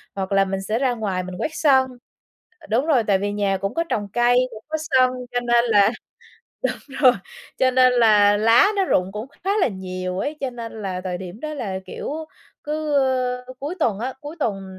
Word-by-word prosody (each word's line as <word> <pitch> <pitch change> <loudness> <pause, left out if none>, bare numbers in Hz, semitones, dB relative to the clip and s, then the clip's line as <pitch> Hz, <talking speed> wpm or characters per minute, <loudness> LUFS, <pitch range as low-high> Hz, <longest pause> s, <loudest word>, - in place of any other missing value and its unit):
hoặc 190 -1 -3
là 195 0 +4
mình 195 0 -3
sẽ 215 +4 -1
ra 260 -2 +1
ngoài 200 -6 -2
mình 185 0 -7
quét 310 - -2
sân, 270 -5 +4 0.7
ờ, - - -15
đúng 245 +7 +2
rồi, 280 -7 +3
tại 200 -2 +3
vì 205 +1 -2
nhà 200 -1 0
cũng 195 +1 -3
có 335 - 0
trồng 205 -2 -2
cây, 240 0 +3
cũng 220 -1 -11
có 315 0 -2
sân. 255 -2 +5 0.2
Cho 245 - 0
nên 240 0 +3
là 210 -3 +4 0.8
đúng 270 -1 -12
rồi, 255 -2 +8 0.5
cho 260 -1 +4
nên 255 0 +5
là 210 -4 +5
lá 230 - +5
nó 390 - +2
rụng 185 - +1
cũng 210 +3 -5 0.2
khá 390 - 0
là - - +3
nhiều 185 -2 -5
ấy, 295 +8 -3
cho 270 - -2
nên 230 -2 -8
là 185 -2 -3
thời 180 -1 -3
điểm 185 +3 -9
đó 305 +1 -4
là, 195 -9 -4
kiểu, - - -6 0.5
cứ, 305 0 -2
ơ, 255 -2 +1
cuối 290 +6 -4
tuần 225 - +1
á, 250 +4 -3
cuối 295 +3 -8
tuần 200 -9 -2
230 Hz, 215 wpm, -22 LUFS, 195-265 Hz, 0.8 s, rồi